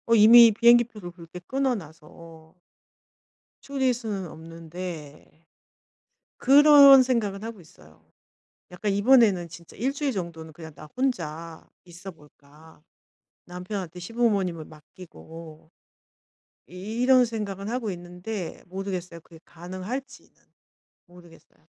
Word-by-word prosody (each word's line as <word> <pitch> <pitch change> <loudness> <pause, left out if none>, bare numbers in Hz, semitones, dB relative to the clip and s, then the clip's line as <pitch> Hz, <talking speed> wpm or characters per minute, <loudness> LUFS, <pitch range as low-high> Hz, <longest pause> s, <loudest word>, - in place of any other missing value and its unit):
어 230 - +4
이미 230 +2 +8
비행기 235 +2 +5
표를 210 -6 -11
그렇게 170 0 -12
끊어 265 +7 -2
놔서 160 -2 -14 1.1
줄일 265 -2 -1
수는 215 -6 -5
없는데 165 -1 -10 0.9
그런 280 -1 +7
생각은 220 -6 -2
하고 225 -3 -8
있어요. 80 - -20 0.7
약간 190 +3 -4
'이번에는 205 -4 +3
진짜 170 0 -14
1 260 +6 -1
주일 285 -1 -2
정도는 170 -6 -7
그냥 160 0 -12
나 150 +2 -13
혼자 165 - -4 0.2
있어 180 +2 -11
볼까. 150 0 -21 0.6
남편한테 180 -1 -7
시부모님을 195 -6 -1
맡기고.' 160 0 -14 1.0
이 205 +6 -7
이런 255 0 +5
생각은 205 -4 -5
하고 240 -3 -3
있는데 180 +2 -8
모르겠어요. 185 -2 -6
그게 165 0 -18
가능할지는 185 +11 -9 0.7
모르겠어요. 175 -3 -20
185 Hz, 260 characters per minute, -25 LUFS, 165-230 Hz, 1.1 s, 이미